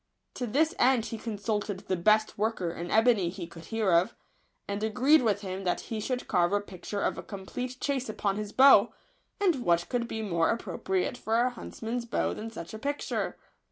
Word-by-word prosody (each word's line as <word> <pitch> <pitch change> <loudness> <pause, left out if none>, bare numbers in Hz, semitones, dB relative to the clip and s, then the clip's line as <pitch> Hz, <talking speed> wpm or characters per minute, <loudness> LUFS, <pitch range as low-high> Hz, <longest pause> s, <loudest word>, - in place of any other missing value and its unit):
To 250 - -3
this 310 +8 +2
end 250 -3 +4
he 225 - -5
consulted 210 -3 -3
the 190 - -1
best 215 +5 +3
worker 205 -5 -1
in 175 +1 -6
ebony 220 -5 +4
he 180 0 -6
could 165 0 -12
hear 220 0 0
of, 170 +2 +3 0.5
and 200 +1 -3
agreed 255 +8 +4
with 210 -4 +1
him 190 -1 -5
that 180 - 0
he 225 - -5
should 250 +3 -3
carve 175 -1 +2
a 205 - +3
picture 200 0 -6
of - - -1
a - - -4
complete 245 +6 -6
chase 270 -4 -1
upon 200 -2 -1
his 210 -1 -4
bow; 270 +3 +6 0.4
and 370 -7 +3
what 170 -3 +2
could 240 -2 -1
be 220 -1 -4
more 170 -5 +1
appropriate 190 -1 -1
for 225 0 +1
a 250 +1 +2
huntsman's 235 0 -5
bow 235 - 0
than 220 +1 -6
such 195 -6 -8
a 220 - -6
picture 285 +4 -2
215 Hz, 195 wpm, -29 LUFS, 190-245 Hz, 0.5 s, bow